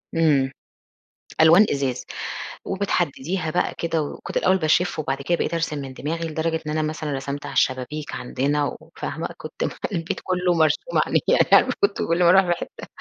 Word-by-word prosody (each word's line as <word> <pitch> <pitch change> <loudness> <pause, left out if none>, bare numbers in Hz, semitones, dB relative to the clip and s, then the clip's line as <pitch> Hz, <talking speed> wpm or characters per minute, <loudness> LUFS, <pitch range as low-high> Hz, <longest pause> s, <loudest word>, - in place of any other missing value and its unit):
إمم، 145 -5 +3 0.9
ألوان 165 +6 +7
إزاز 135 -3 -2 0.6
وبتحدّديها 180 -3 -1
بقى 180 +2 0
كده، 165 -1 0
وكنت 145 - -5
الأول 190 +1 +3
باشِف 165 0 +1
وبعد 140 -2 -2
كده 170 +5 0
بقيت - - -2
أرسم 165 -2 -1
من 135 -2 -7
دماغي، 165 +5 -3
لدرجة 160 +1 -1
إن 150 - -1
أنا 155 - 0
مثلًا 155 -1 -3
رسمت 140 +1 -4
على - - -6
الشبابيك 130 +4 -1
عندنا 140 +3 -1
وفاهمة، - - -5
كنت - - -6
مخ - - -3
البيت 165 -1 -2
كله 180 -1 +1
مرسوم 165 - +2
عليه، - - +2 0.3
يعني - - +7
كنت 405 - +2
كل 170 +1 +2
ما 170 - +6
أروح 190 +2 +6
في 175 - 0
حتّه 175 - -5
160 Hz, 170 wpm, -23 LUFS, 145-175 Hz, 0.9 s, ألوان